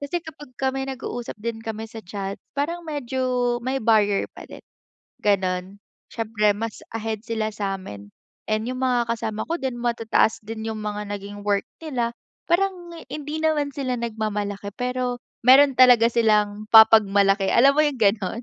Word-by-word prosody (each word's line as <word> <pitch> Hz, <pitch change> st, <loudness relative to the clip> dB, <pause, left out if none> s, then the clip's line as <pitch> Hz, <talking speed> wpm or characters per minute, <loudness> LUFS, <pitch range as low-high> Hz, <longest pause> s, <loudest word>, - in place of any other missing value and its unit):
kasi 285 Hz, +5 st, -3 dB
kapag 295 Hz, -3 st, -11 dB
kami 265 Hz, 0 st, -1 dB
nag-uusap 245 Hz, -3 st, -6 dB
din 230 Hz, 0 st, -4 dB
kami 225 Hz, 0 st, -5 dB
sa 225 Hz, -, -9 dB
chat, 195 Hz, +1 st, -5 dB, 0.2 s
parang 335 Hz, +5 st, -1 dB
medyo 255 Hz, -4 st, -1 dB
may 260 Hz, +1 st, -1 dB
barrier 215 Hz, -4 st, +2 dB
pa -, -, -11 dB
din, -, -, -12 dB, 0.5 s
ganun. 190 Hz, -1 st, 0 dB, 0.4 s
Syempre, 220 Hz, -2 st, +1 dB
mas 225 Hz, +1 st, -5 dB, 0.2 s
ahead 220 Hz, -1 st, -3 dB
sila 220 Hz, -2 st, -2 dB
sa'min 190 Hz, -, -5 dB, 0.4 s
and 215 Hz, +1 st, 0 dB
yung 255 Hz, +1 st, -4 dB
mga 245 Hz, -2 st, +2 dB
kasama 220 Hz, -2 st, -3 dB
ko 335 Hz, -, -2 dB
din, 255 Hz, -2 st, -2 dB
matataas 230 Hz, -2 st, +1 dB
din 220 Hz, +1 st, -6 dB
yung 220 Hz, -1 st, -4 dB
mga 210 Hz, 0 st, -4 dB
naging 205 Hz, 0 st, -6 dB
work 200 Hz, -1 st, +2 dB, 0.2 s
nila, 255 Hz, -7 st, -2 dB, 0.4 s
parang 355 Hz, -1 st, 0 dB, 0.2 s
hindi 300 Hz, +1 st, -5 dB
naman 305 Hz, -2 st, +1 dB
sila 260 Hz, -2 st, -3 dB
nagmamalaki, 210 Hz, -3 st, -3 dB
pero 250 Hz, 0 st, -2 dB, 0.2 s
meron 270 Hz, 0 st, +7 dB
talaga 245 Hz, -2 st, +7 dB
silang 215 Hz, -2 st, +1 dB
papagmalaki, 200 Hz, -3 st, +6 dB
alam 275 Hz, +7 st, +5 dB
mo 280 Hz, -, -2 dB
yung 290 Hz, -, -1 dB
ganun? 210 Hz, +2 st, +1 dB
225 Hz, 155 wpm, -23 LUFS, 210-260 Hz, 0.5 s, meron